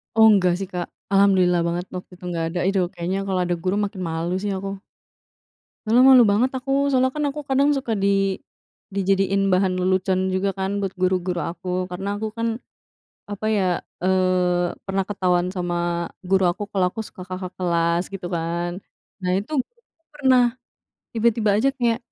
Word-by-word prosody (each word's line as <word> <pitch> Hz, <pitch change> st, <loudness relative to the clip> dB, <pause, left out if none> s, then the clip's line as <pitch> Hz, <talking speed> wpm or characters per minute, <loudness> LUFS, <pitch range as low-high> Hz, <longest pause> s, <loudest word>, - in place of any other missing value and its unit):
Oh, 220 Hz, -, +7 dB
enggak 185 Hz, -3 st, +4 dB
sih, 195 Hz, -, -4 dB
Kak. 180 Hz, -2 st, -3 dB, 0.2 s
Alhamdulillah 190 Hz, -3 st, +4 dB
banget 175 Hz, +1 st, -2 dB
waktu 180 Hz, -, -7 dB
itu 180 Hz, -, -20 dB
enggak 165 Hz, -1 st, -2 dB
ada 175 Hz, -, -1 dB
itu. 195 Hz, -1 st, +2 dB
Kayaknya 180 Hz, +2 st, -2 dB
kalau 185 Hz, -2 st, 0 dB
ada 175 Hz, 0 st, 0 dB
guru 185 Hz, +1 st, +1 dB
makin 195 Hz, -2 st, -7 dB
malu 165 Hz, +1 st, -2 dB
sih, 205 Hz, 0 st, -2 dB
aku. 195 Hz, +1 st, -5 dB, 1.1 s
Malah 240 Hz, +3 st, +5 dB
malu 255 Hz, -2 st, +9 dB
banget 245 Hz, +6 st, +2 dB
aku. 265 Hz, +1 st, -5 dB, 0.2 s
Soalnya, 260 Hz, 0 st, +3 dB
kan 300 Hz, -, -1 dB
aku 300 Hz, -, -6 dB
kadang 275 Hz, +2 st, +3 dB
suka 250 Hz, -4 st, -2 dB
di -, -, +3 dB, 0.9 s
dijadiin 195 Hz, 0 st, +1 dB
bahan 185 Hz, 0 st, +2 dB
lelucon 185 Hz, 0 st, +1 dB
juga 190 Hz, +1 st, +1 dB
kan, 190 Hz, +1 st, -1 dB
buat 195 Hz, -, -1 dB
guru-guru 180 Hz, -1 st, 0 dB
aku. 185 Hz, -, -12 dB, 0.2 s
Karena 185 Hz, +2 st, -5 dB
aku 220 Hz, -, -2 dB
kan, 230 Hz, -, 0 dB, 0.9 s
apa 205 Hz, +2 st, -4 dB
ya, 195 Hz, -, +2 dB, 0.4 s
eee, 180 Hz, -1 st, +2 dB, 0.2 s
pernah 195 Hz, 0 st, 0 dB
ketahuan 180 Hz, -3 st, +1 dB
sama 175 Hz, -1 st, -2 dB, 0.5 s
guru 190 Hz, 0 st, +3 dB
aku 175 Hz, -, -5 dB
kalau 190 Hz, -2 st, +2 dB
aku 220 Hz, -, -6 dB
suka -, -, -14 dB
kakak 185 Hz, 0 st, -5 dB
kelas, 170 Hz, -1 st, +1 dB
gitu 185 Hz, -2 st, -5 dB
kan. 170 Hz, +1 st, -2 dB, 0.5 s
Nah 180 Hz, -, 0 dB
itu, 205 Hz, +10 st, -7 dB
guruku 470 Hz, -, -13 dB
pernah 260 Hz, -4 st, +4 dB, 0.7 s
tiba-tiba 225 Hz, -1 st, +2 dB
aja 250 Hz, +6 st, +3 dB
kayak 235 Hz, -2 st, +1 dB
190 Hz, 170 wpm, -23 LUFS, 180-210 Hz, 1.1 s, malu